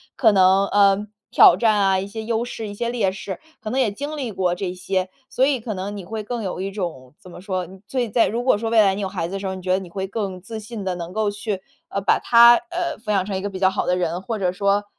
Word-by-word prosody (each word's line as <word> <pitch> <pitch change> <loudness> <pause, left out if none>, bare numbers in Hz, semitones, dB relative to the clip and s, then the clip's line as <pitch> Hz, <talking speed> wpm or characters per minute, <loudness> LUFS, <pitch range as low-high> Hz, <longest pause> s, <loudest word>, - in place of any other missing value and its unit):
可 225 -4 +5
能， 190 0 +5
呃， 200 0 +3 0.2
挑 - - +7
战 220 -3 +2
啊， 195 -1 +3
一 195 - -4
些 220 +2 -6
优 225 0 -1
势， 225 -2 -6
一 205 - -7
些 235 +3 -2
劣 225 -6 0
势， 195 0 -6 0.2
可 215 - -5
能 255 +4 -1
也 240 -6 +2
经 290 +8 -5
历 255 -6 -3
过 180 -3 0
这 180 0 -3
些。 185 +1 -2 0.2
所 260 - +2
以 275 -3 +1
可 220 -2 -5
能 195 +2 -5
你 200 - -7
会 215 +4 -5
更 235 +2 -4
有 185 -3 -4
一 195 +1 -3
种 165 -10 -5
怎 195 -4 -14
么 175 - -11
说， 185 -2 -3 0.2
所 260 - -1
以 235 - -2
在 230 +2 +3
如 235 +3 -2
果 250 -4 +3
说 225 +1 -3
未 225 - +6
来 195 -2 +3
你 205 - -4
有 195 - -1
孩 185 -3 -3
子 185 - -8
的 195 - -3
时 195 - -6
候 190 - -2
儿， - - -5
你 185 - -8
觉 185 0 -2
得 185 - +4
你 190 -2 -6
会 190 +2 -4
更 195 -3 -4
自 220 +4 -7
信 215 -1 -7
地 185 -1 -2
能 175 0 -7
够 215 0 +1
去， 205 -1 -4 0.3
呃， 200 - -2
把 195 - +3
他， 235 0 +7 0.2
呃， 350 0 -2
抚 210 -1 -4
养 195 -2 +2
成 195 -1 -3
一 - - -4
个 205 - -3
比 190 - -6
较 190 - +4
好 190 - -2
的 180 - +2
人， 180 +1 -2
或 220 +1 -3
者 180 -2 +1
说 200 +2 +1
200 Hz, 320 characters per minute, -22 LUFS, 185-220 Hz, 0.3 s, 挑